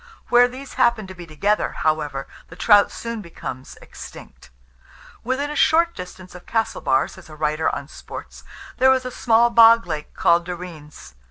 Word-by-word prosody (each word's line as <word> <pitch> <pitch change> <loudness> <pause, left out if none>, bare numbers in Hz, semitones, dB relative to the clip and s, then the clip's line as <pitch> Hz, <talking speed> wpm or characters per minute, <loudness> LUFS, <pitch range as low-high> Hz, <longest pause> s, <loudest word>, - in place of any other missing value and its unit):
Where 245 0 +6
these 260 +2 -10
happen 230 -3 +2
to 190 - -10
be 175 -2 -11
together, 200 +7 0
however, 150 -3 -1 0.2
the - - -13
trout 205 -2 +5
soon 230 -1 -6
becomes 160 -7 -9
extinct. - - -12 0.7
"Within 265 +4 -2
a - - -5
short 335 +1 +3
distance 180 0 -10
of 180 - -13
Castlebar," 180 -12 0
says - - -14
a 155 - -11
writer 155 +1 0
on 140 - -5
sports, - - -10 0.4
"there 260 +1 +6
is 260 -1 -3
a 255 - -4
small 235 0 +3
bog 230 -1 +7
lake 155 -3 -6
called 170 +1 +2
Derreens. 170 - -9
190 Hz, 165 wpm, -21 LUFS, 155-235 Hz, 0.7 s, bog